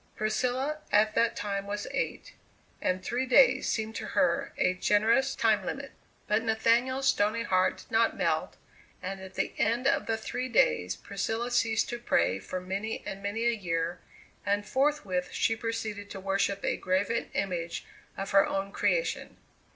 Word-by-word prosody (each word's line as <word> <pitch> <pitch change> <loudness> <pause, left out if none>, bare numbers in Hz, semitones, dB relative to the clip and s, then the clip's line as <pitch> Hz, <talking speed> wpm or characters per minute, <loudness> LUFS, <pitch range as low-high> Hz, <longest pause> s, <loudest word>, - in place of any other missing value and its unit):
Priscilla 255 +7 -1
at 215 +1 +4
that 230 +1 +2
time 200 -1 -3
was 205 +1 -3
eight, - - -3 0.5
and 185 0 0
three 255 +2 -1
days 255 +1 +5
seemed 220 0 -1
to - - -5
her 275 0 +2
a 185 - +2
generous 225 +8 +2
time 215 -3 +2
limit. 275 +6 -5 0.3
But 210 +1 +2
Nathaniel's 235 +4 +2
stony 215 -1 +2
heart 185 -4 +2
did - - -15
not 225 0 +2
melt, - - 0 0.5
and 195 +1 -4
at 190 0 -10
the - - -1
end 235 +4 +1
of 280 - +2
the 225 -1 0
three 250 +3 -4
days 90 - +2
Priscilla 225 - -3
ceased 225 -2 +2
to 240 - -4
pray 95 - +1
for 185 - -5
many 195 +4 -4
and 195 0 -6
many 205 +3 -2
a 235 - +4
year, 170 -5 -2 0.4
and 205 +1 0
forthwith 260 -10 0
she 225 - +1
proceeded 220 -3 -4
to 195 - -7
worship 195 +1 0
a - - 0
graven 195 +5 0
image 175 -3 -2 0.3
of 195 0 -4
her 195 0 +5
own 195 0 -2
creation. - - -1
215 Hz, 165 wpm, -29 LUFS, 195-235 Hz, 0.5 s, days